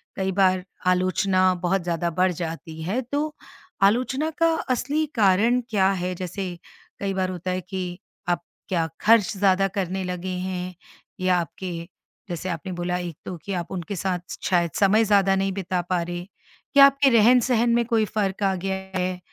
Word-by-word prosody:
कई 190 0 -1
बार 185 -1 +3 0.2
आलोचना 185 +1 +3
बहुत 190 +1 +1
ज़्यादा 170 0 -1
बढ़ 185 0 +4
जाती 160 -1 -6
है, 200 +10 -1
तो 295 +4 -3 0.5
आलोचना 255 +8 +2
का 330 0 +4 0.2
असली 285 +5 0
कारण 220 +4 +4
क्या 195 -3 +3
है? 180 -1 -2
जैसे 180 0 -5 0.4
कई 195 -1 -2
बार 185 -1 0
होता 185 0 -4
है 185 - -2
कि 180 0 -5 0.3
आप 175 - +1 0.3
क्या 165 -3 +1
ख़र्च 220 -3 +5
ज़्यादा 195 0 +3
करने 190 0 -1
लगे 180 0 -4
हैं, 180 0 -4 0.4
या 185 0 +2
आपके 175 +2 -4 0.6
जैसे 175 +2 -4
आपने 170 +2 -4
बोला 175 +1 -2
एक 175 -4 -5
तो 180 - -5
कि 200 - -3
आप 175 -1 -4
उनके 190 +1 -4
साथ 180 0 -3
शायद 170 -3 +2
समय 210 +3 +5
ज़्यादा 195 -2 +4
नहीं 195 0 0
बिता 185 -2 -2
पा 180 -2 +1
रहे, 175 +1 -5 0.5
या 275 - +11
आपके 275 0 +4
रहन-सहन 240 +1 +4
में 235 - +3
कोई 225 -2 +2
फ़र्क 200 -1 -2
आ 195 - +3
गया 190 +1 -2 0.2
है, 180 0 -2
185 Hz, 170 wpm, -24 LUFS, 180-205 Hz, 0.6 s, या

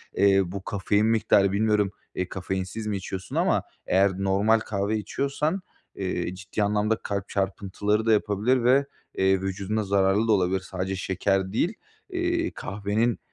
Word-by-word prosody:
Eee, 100 -1 +5
bu 95 +2 -6
kafein 105 +2 +1
miktarı 110 -3 +3
bilmiyorum, 105 -1 +2 0.2
eee, 90 0 -2
kafeinsiz 95 +3 -4
mi 105 -2 -1
içiyorsun 95 0 -6
ama - - +2 0.2
eğer 95 +1 +4
normal 100 +3 +3
kahve 105 0 -1
içiyorsan, 140 - -1 0.3
eee, 90 -1 -2
ciddi 100 +2 -3
anlamda 105 +2 +1
kalp 100 -2 -3
çarpıntıları 100 +2 -1
da 115 - +3
yapabilir 110 +4 +2
ve, 135 +3 +4 0.3
eee, 95 0 +3
vücuduna 100 +3 -2
zararlı 100 +2 +2
da - - +3
olabilir. 95 -2 +2
Sadece 95 0 -4
şeker 95 0 0
değil, 175 - +1 0.4
iii, 345 -2 -1
kahvenin 105 +3 -1
100 Hz, 145 wpm, -26 LUFS, 95-110 Hz, 0.4 s, Eee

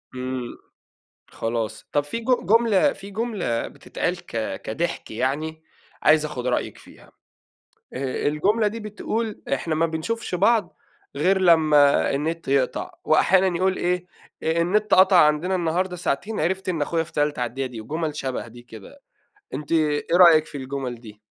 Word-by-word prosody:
إمم، 125 -1 -5 0.7
خلاص. 115 -1 -4
طب 145 -1 +1
في 145 +10 -4
ج - - -11 0.2
جملة 225 +5 +3
في 200 +1 -11
جملة 205 - -2
بتتقال - - -4
ك - - -4
كضحك - - -3
يعني 150 +7 -2 0.4
عايز 155 0 +5
آخد 130 -5 -5
رأيِك 125 - -1
فيها، - - -17 0.8
الجملة 150 - 0
دي 225 +2 -7
بتقول: 215 +1 -4
"إحنا 155 +4 0
ما 165 +2 +2
بنشوفش 175 +7 -3
بعض 205 +1 +2 0.4
غير 190 +7 +2
لمّا 155 -5 +5
النت 160 +4 -2
يقطع"، 135 -1 0
وأحيانًا 190 -1 +3
يقول 185 +2 +1
إيه: 180 0 -1 0.4
"النت 175 +6 +2
قطع 190 0 +6
عندنا 150 +5 0
النهارده 180 +1 -1
ساعتين 180 +5 -2
عرفت 190 +4 -1
إن 165 -5 -1
أخويا 165 +2 0
في 165 - -16
تالتة 145 -2 0
إعدادي" 125 +2 -2
ودي 120 -3 -8
وجمل 155 +5 -4
شبه 130 -4 -4
دي 120 +1 -13
كده. 120 - -13 0.5
أنتِ 150 - -6
إيه 150 -3 +1
رأيِك 165 -4 +7
في 145 - -8
الجمل 130 -2 -4
دي؟ 105 -3 -13
160 Hz, 145 wpm, -23 LUFS, 140-190 Hz, 0.8 s, رأيِك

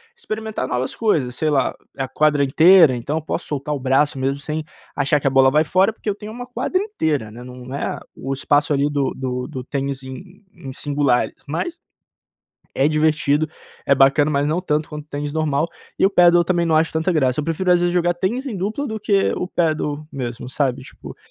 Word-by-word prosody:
experimentar 220 - -4
novas 125 0 -2
coisas, 150 - 0
sei 155 - 0
lá, 140 -3 +1 0.2
é 135 - -1
a 130 - -3
quadra 150 0 +2
inteira 160 +2 +6
então 140 +6 -3
eu 160 - -2
posso 165 +2 -4
soltar 150 0 -3
o 145 - -3
braço 135 +2 +1
mesmo, 135 +1 0
sem 150 +2 -4 0.3
achar 145 0 +1
que - - -12
a - - +5
bola 135 0 +5
vai 150 +3 +3
fora 190 +6 +2
porque 215 - -5
eu - - +1
tenho 210 +1 -9
uma 245 +1 -7
quadra 370 +9 -1
inteira, 155 - -2
né, 120 +2 -10
nã 125 0 -10
não 125 +1 -9
é 140 - -3 0.2
o 135 +1 -4
espaço 145 +2 +1
ali 140 +1 +1
do 140 -2 -1
do 125 -1 -3
do 130 -5 -6
tênis 140 0 -3
em 180 +10 -11
em 135 -1 -9
singulares 140 -3 0
mas 170 - -3 1.0
é 140 - +3
divertido, 155 -1 +2 0.4
é - - +4
bacana 140 +2 +4
mas 140 0 +1
não 160 +4 0
tanto 150 -4 -1
quanto 150 -1 -7
o - - -43
tênis 145 0 -4
normal. 155 0 0 0.3
E - - +4
o 195 - +4
Padel 175 -2 +5
também 170 0 +1
não 160 -1 +2
acho 160 +1 +2
tanta 160 +3 0
graça, 135 -4 +1
eu - - -1
prefiro 165 +4 0
às 175 - +5
vezes 175 0 +1
jogar 175 0 +2
tênis 235 +10 -2
em 215 -6 -4
dupla 215 +10 -2
do 220 -1 -4
que 200 -1 +2
o 180 - -3
Padel 155 -3 -1
mesmo, 125 -2 -5
sabe 130 -2 -1
tipo, - - -11
150 Hz, 220 wpm, -21 LUFS, 135-175 Hz, 1.0 s, inteira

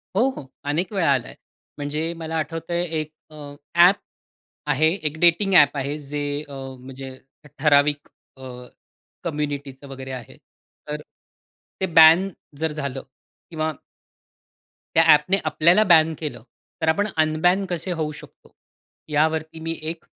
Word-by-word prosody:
हो, 240 +7 +3
हो. - - -7 0.2
अनेक 160 +5 -1
वेळा 175 -7 +2
आलाय. 130 -3 -3 0.4
म्हणजे 150 +3 -3
मला 160 0 -4
आठवतंय 165 +2 -2 0.2
एक 155 0 -5 0.2
अ, 155 - -14 0.4
ॲप 175 +3 +7 0.7
आहे 155 +3 +3
एक 155 -5 -4
डेटिंग 175 +3 +4
ॲप 145 -3 +6
आहे. 140 +2 -2
जे 145 0 -4
अ, - - -11 0.3
म्हणजे 130 +1 -9 0.4
ठराविक 145 0 +3 0.3
अ, 130 - -14 0.8
कम्युनिटीचं 145 -3 -4
वगैरे 135 -1 -8
आहे. 125 -3 -8 0.5
तर 150 0 -4 0.8
ते 190 - +1
बॅन 165 +4 +8 0.3
जर 160 -1 0
झालं 140 -3 -4 0.5
किंवा 160 -1 -2 1.2
त्या 165 - +6
ॲप 150 0 +4
ने 195 - +4
आपल्याला 170 +6 +4
बॅन 160 0 +5
केलं 150 -8 -6 0.4
तर 160 - 0
आपण 205 +6 +2
अनबॅन 160 +5 +2
कसे 175 +1 -3
होऊ 160 -3 -2
शकतो? 150 - -15 0.5
यावरती 160 +1 0
मी 165 +1 -3
एक 160 +1 -5
155 Hz, 135 wpm, -23 LUFS, 145-165 Hz, 1.2 s, बॅन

